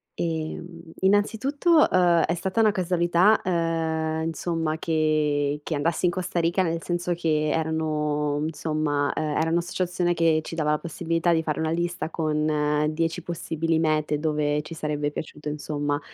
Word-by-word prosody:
Ehm, 165 +1 -4 0.2
innanzitutto, 260 - +3
uhm, 175 -2 +4
è 165 - +1
stata 190 +5 -2
una 220 -1 +5
casualità, 180 +1 +3
ehm, 160 -2 -1
insomma 165 -1 -2
che 150 -3 +1
che 160 - -2
andassi 160 +4 0
in 175 - +3
Costa 175 -1 -2
Rica, 170 +3 +2
nel 165 -1 -1
senso 175 0 -1
che 155 -3 0
erano, 150 -2 -1
insomma, 155 -2 -1
uhm, 155 - -1
era 160 - +1
un'associazione 175 +1 0
che 165 -1 +3
ci 165 - -7
dava 150 -2 +1
la 150 - +1
possibilità 165 +1 0
di 160 -1 +1
fare 155 -2 -2
una 160 0 0
lista 170 0 -2
con 150 -2 0
10 165 +2 -1
possibili 165 -1 -2
mete 155 -2 +1
dove 150 -1 0
ci 165 - -8
sarebbe 150 -2 -2
piaciuto 150 0 -6
insomma, 145 -1 -2
160 Hz, 150 wpm, -25 LUFS, 150-175 Hz, 0.2 s, una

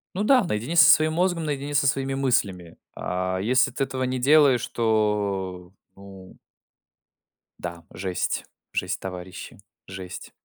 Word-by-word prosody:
Ну 205 - -1
да, 250 -3 +4
наедине 120 +7 -2
со 165 - +8
своим 155 0 +5
мозгом, 175 0 0
наедине 145 -1 -3
со 140 - +3
своими 135 0 0
мыслями. 100 -11 -1 0.2
А 95 +1 -2
если 125 +6 +2
ты 135 - -2
этого 130 -1 -3
не 130 0 -1
делаешь, 135 -2 +4
то, 100 -5 -1 0.2
ну 95 -1 -13 1.2
Да, 85 -1 -7
жесть 95 -1 -2 0.3
жесть, - - -2
товарищи. 90 -1 -8 0.3
Жесть. 95 -1 -8
110 Hz, 130 wpm, -24 LUFS, 95-140 Hz, 1.2 s, со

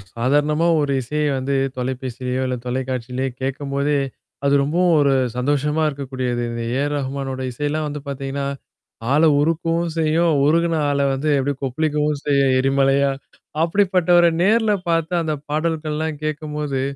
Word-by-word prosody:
சாதாரணமா 145 +7 +2
ஒரு 145 - 0
இசைய 150 +5 -2
வந்து 135 +1 -1 0.2
தொலைபேசிலயோ! 130 0 -3
இல்ல 125 - -1
தொலைக்காட்சியிலயோ 130 0 -3
கேட்கும்போதே, 140 +2 -1 0.5
அது 140 - +3
ரொம்பவும் 170 +4 +2
ஒரு 140 -1 +3 0.2
சந்தோஷமா 145 +4 0
இருக்கக்கூடியது. 130 -3 -3
இந்த 115 0 -4
ஏ - - 0
ஆர் 145 0 -2
ரஹ்மானோட 135 -1 -4
இசையில்லாம் 150 +4 -2
வந்து 145 0 -5
பார்த்தீங்கன்னா, 140 0 -4 0.7
ஆள 155 +3 +4 0.2
உருக்கவும் 165 +2 0
செய்யும். 160 +1 +2
உருகுன 165 +2 +2
ஆள 140 0 0
வந்து 140 +3 -1
எப்பிடி, 140 +2 0
கொப்பளிக்கவும் 150 +2 0
செய்யும் 140 -2 +3
எரிமலையா. 135 +1 +2 0.5
அப்பிடிப்பட்டவர 180 -1 +3 0.2
நேர்ல 220 +1 +3 0.2
பார்த்த 165 +1 +1
அந்த 155 -1 -1
பாடல்கள்லாம் 155 -1 -2
கேட்கும்போது, 150 -3 -3
145 Hz, 125 wpm, -21 LUFS, 135-155 Hz, 0.7 s, ஆள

